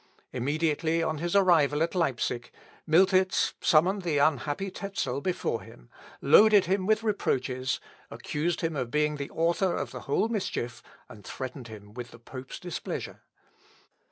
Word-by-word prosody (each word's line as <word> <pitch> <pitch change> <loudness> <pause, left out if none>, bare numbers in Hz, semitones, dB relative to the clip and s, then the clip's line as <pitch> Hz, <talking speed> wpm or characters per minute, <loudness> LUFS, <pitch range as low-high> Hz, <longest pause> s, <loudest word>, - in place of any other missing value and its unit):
Immediately 155 +5 0
on 155 -2 -2
his 175 +3 -2
arrival 160 -6 +4
at 170 - -2
Leipsic 125 -8 -1 0.4
Miltitz 185 +3 +3
summoned 185 +6 +3
the 165 -5 -1
unhappy 145 +5 +1
Tezel 140 -11 -3
before 185 +1 -2
him, - - -15 0.3
loaded 205 +7 +7
him 190 +1 0
with 215 +1 +2
reproaches, 130 - -1 0.3
accused 160 +3 -2
him 165 -1 -1
of 130 -4 -2
being 150 +2 +1
the 140 -1 -5
author 170 +2 +1
of - - -3
the - - -7
whole 205 - +2
mischief, 185 - -3 0.3
and 105 - -13
threatened 130 -1 -7
him 105 -2 -12
with 120 0 -7
the 115 - -14
pope's 130 +2 -9
displeasure. 175 -2 -6
155 Hz, 145 wpm, -28 LUFS, 130-185 Hz, 0.4 s, loaded